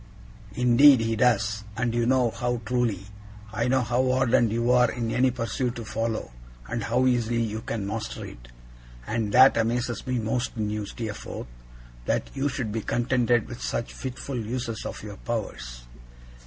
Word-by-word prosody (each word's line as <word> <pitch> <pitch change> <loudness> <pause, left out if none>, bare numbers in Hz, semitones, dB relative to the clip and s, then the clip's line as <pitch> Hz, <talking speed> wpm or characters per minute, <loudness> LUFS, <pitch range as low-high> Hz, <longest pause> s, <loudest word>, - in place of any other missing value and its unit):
'Indeed 125 +2 +6
he 115 0 0
does, 110 -3 +2
and 120 -1 0
you 120 0 +1
know 125 -2 +3
how 120 0 -2
truly; 115 -5 0 0.5
I 115 +2 0
know 130 +1 +3
how 125 +3 +1
ardent 125 -3 +3
you 120 +2 +1
are 125 -1 +5
in 115 -2 -3
any 130 +2 +3
pursuit 120 0 -2
you 115 - -6
follow, 115 - -2 0.4
and 115 - -3
how 125 +3 +2
easily 120 -2 +2
you 110 0 -3
can 115 -3 -3
master 105 +2 -4
it. - - -11 0.6
And 110 - -1
that 130 0 +7
amazes 120 0 -1
me 130 -1 0
most 115 +2 -2
in 105 -1 -1
you, 105 -1 -3
Steerforth 110 0 -6 0.6
that - - 0
you 140 +1 0
should 120 -5 -3
be 110 +1 -2
contented 120 -1 +1
with 120 -1 -8
such 115 - -3
fitful 130 0 -5
uses 115 -1 -4
of - - -7
your 105 -1 -8
powers. - - -5
120 Hz, 170 wpm, -26 LUFS, 110-125 Hz, 0.6 s, that